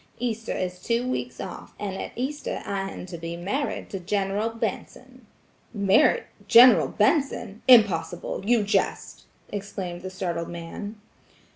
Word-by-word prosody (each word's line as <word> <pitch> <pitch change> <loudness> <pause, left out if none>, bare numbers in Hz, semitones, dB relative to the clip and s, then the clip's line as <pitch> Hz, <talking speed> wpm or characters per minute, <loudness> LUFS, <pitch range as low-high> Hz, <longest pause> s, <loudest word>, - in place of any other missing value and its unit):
Easter 230 -2 -3
is 180 0 -4
two 235 +4 0
weeks 255 - -3
off, - - -8
and 200 -2 -4
at - - -5
Easter 270 +5 -3
I 195 -1 -2
am - - -8
to 175 -2 -8
be 165 +1 -5
married 235 +12 -3
to 195 - -4
General 200 +4 -1
Benson." 225 0 -6 0.5
"Married–General 235 - +5
Benson! 235 -3 0
Impossible! 185 -9 +4
You 230 +1 +3
jest!" 205 - -1 0.2
exclaimed 190 -3 -5
the 185 - -5
startled 175 -3 -3
man. 170 +5 -7
200 Hz, 130 wpm, -25 LUFS, 180-230 Hz, 0.5 s, Married–General